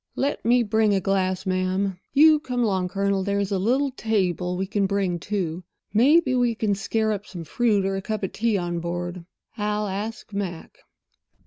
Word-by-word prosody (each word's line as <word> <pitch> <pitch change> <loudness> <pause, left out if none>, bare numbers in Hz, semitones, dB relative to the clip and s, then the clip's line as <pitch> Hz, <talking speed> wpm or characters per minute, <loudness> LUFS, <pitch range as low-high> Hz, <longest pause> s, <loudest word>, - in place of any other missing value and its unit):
"Let 280 +2 -1
me 240 +1 +4
bring 215 -1 +2
a - - +2
glass, 190 0 0
ma'am. 185 0 -1
You 305 +1 +6
come 250 -5 -2
along, 190 -4 +1
Colonel—there's 200 +1 0
a 195 - +1
little 260 +8 +1
table 185 -7 -1
we 190 - -1
can 200 0 0
bring, 190 -3 0
too. 180 -3 -3 0.3
Maybe 265 +5 +4
we 245 -2 +2
can 215 -2 0
scare 220 +3 0
up 205 0 -4
some 175 -3 -7
fruit 205 +3 +1
or 195 0 0
a 195 - -3
cup 215 +1 -4
of 190 - -2
tea 225 -2 0
on 175 -2 -2
board. 175 +1 -4 0.4
I'll 210 0 0
ask 210 +2 -5
Mac." 185 -5 -5
200 Hz, 180 wpm, -24 LUFS, 185-220 Hz, 0.4 s, You